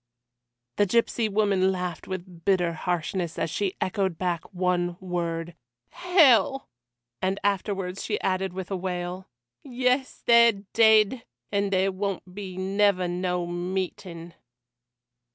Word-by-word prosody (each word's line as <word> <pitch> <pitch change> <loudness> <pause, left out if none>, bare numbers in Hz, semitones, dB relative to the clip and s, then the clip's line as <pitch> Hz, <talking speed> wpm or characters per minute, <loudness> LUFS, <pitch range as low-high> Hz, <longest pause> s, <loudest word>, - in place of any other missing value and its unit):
The 205 - +3
gipsy 230 +1 +1
woman 195 -2 +2
laughed 180 -2 -4
with 180 -2 -7
bitter 175 -3 +2
harshness 175 0 -2
as 165 - -1
she 195 +1 -1
echoed 190 -3 -1
back 175 -2 -1
the - - -17
one 180 -2 -1
word 170 -2 -3 0.4
"Hell!" 275 - +4 0.5
and 190 +1 0
afterwards 195 -2 -1
she 210 - -2
added 190 0 0
with 185 +1 -7
a - - 0
wail: 180 0 -4 0.3
"Yes, 255 0 -1
they're 235 -1 +7 0.2
dead! 220 +1 +5 0.3
and 200 0 0
there 190 0 +2
won't 190 -1 -4
be 190 -2 -7
never 195 -1 +2
no 180 0 -1
meeting." 175 -1 -4
190 Hz, 125 wpm, -26 LUFS, 180-205 Hz, 0.5 s, they're